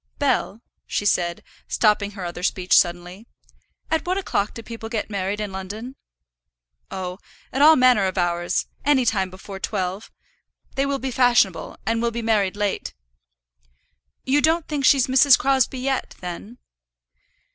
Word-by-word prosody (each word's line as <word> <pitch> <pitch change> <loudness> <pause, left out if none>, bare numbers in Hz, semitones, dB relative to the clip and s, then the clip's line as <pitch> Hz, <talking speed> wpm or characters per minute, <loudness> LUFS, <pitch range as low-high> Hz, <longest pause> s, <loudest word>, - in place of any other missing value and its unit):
"Bell," 255 -5 -1 0.2
she 205 - -2
said, 175 -3 0 0.2
stopping 210 -2 +1
her 185 - -5
other 175 0 -6
speech 180 0 +1
suddenly, 175 +5 0 0.6
"at 320 - +1
what 370 +1 0
o'clock 215 - -2
do 230 - -8
people 225 0 -8
get 220 -2 -3
married 200 +1 -2
in 210 -2 -4
London?" 210 +7 -7 0.9
"Oh, 185 0 -5 0.3
at 265 - 0
all 315 +2 +8
manner 250 -6 +4
of 190 0 -3
hours, 175 -1 0 0.2
any 275 -3 +3
time 190 -5 +1
before 190 +1 -10
twelve. 190 +2 -3 0.6
They 275 +1 0
will 280 0 0
be 265 0 -4
fashionable, 240 -7 +2
and 225 +2 0
will 235 - +1
be 235 0 -5
married 210 -4 +1
late." 205 -1 -2 1.3
"You 280 +3 +2
don't 320 +1 +2
think 290 -3 -2
she's 270 -2 +5
Mrs. 265 0 +6
Crosbie 265 -1 +1
yet, 265 +1 -2
then?" 180 +6 -8
220 Hz, 150 wpm, -22 LUFS, 190-260 Hz, 1.3 s, all